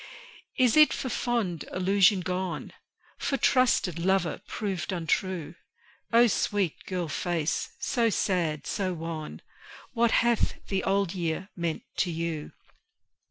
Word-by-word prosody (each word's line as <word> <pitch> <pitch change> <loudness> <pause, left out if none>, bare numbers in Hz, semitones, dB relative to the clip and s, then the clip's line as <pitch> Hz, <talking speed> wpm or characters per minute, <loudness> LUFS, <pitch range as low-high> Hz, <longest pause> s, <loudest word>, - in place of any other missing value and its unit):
Is 250 -3 +4
it 305 0 +7
for 260 - -3
fond 220 - -1
illusion 190 +1 +3
gone? 180 -2 -3 0.5
For 275 - 0
trusted 245 - +2
lover 185 -1 +1
proved 190 -7 -3
untrue? 175 -1 -1 0.6
O 235 +1 +7
sweet 200 -5 +1
girl 180 -3 -2
face, 165 0 -1
so 235 -3 +1
sad, 170 -8 0
so 185 -3 -2
wan 160 -1 -6 0.5
What 235 -1 +3
hath 235 0 +2
the 195 -1 0
Old 195 -2 +1
Year 175 +1 -3
meant 170 -3 -2
to 180 - +1
you? 165 -2 -3
185 Hz, 120 wpm, -28 LUFS, 170-205 Hz, 0.6 s, it